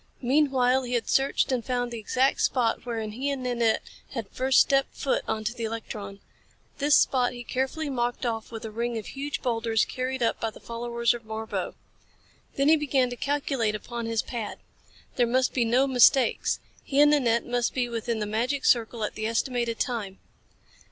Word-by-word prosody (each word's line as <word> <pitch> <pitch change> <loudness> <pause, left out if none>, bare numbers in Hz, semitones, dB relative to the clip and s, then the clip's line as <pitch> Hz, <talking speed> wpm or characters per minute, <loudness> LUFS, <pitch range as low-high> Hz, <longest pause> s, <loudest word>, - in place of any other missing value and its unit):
Meanwhile 265 -1 +3
he 250 -1 -5
had 240 - 0
searched 270 0 +2
and 250 -3 0
found 245 -1 -2
the 235 - -5
exact 260 +5 +1
spot 240 -1 +1
wherein 225 -2 -3
he 260 +6 -2
and 275 -2 -3
Nanette 235 -3 +1 0.3
had 230 -6 -4
first 260 +1 +3
stepped 275 0 +3
foot 275 - 0
onto 220 +1 -2
the 235 -2 -4
electron. 210 -3 -6 0.6
This 290 0 +5
spot 250 -2 +2
he 245 0 -7
carefully 265 +6 -2
marked 245 -2 -2
off 225 -1 -3
with 225 -1 -7
a 220 - -5
ring 235 +1 -2
of 220 - -5
huge 285 +1 -5
boulders 230 -2 +1
carried 255 0 -3
up 230 - +1
by 225 - -1
the 220 - -14
followers 235 0 -1
of 240 - -6
Marbo. 220 0 -4 0.8
Then 275 +1 +2
he 320 +1 +6
began 270 -4 +1
to - - -4
calculate 270 -5 -1
upon 235 +2 -5
his 225 -1 0
pad. 230 -4 -5 0.6
There 245 -2 +3
must 255 +2 +1
be 245 -3 +2
no 245 +4 +3
mistakes. 260 -1 +4 0.2
He 275 - 0
and 295 0 +7
Nanette 235 -6 +2
must 245 -1 -1
be 250 -2 +1
within 230 -1 -2
the 210 - -2
magic 240 +7 -1
circle 230 -1 +2
at 210 - -2
the 215 0 -3
estimated 235 0 -1
time. 210 -6 -2
240 Hz, 185 wpm, -26 LUFS, 225-260 Hz, 0.8 s, and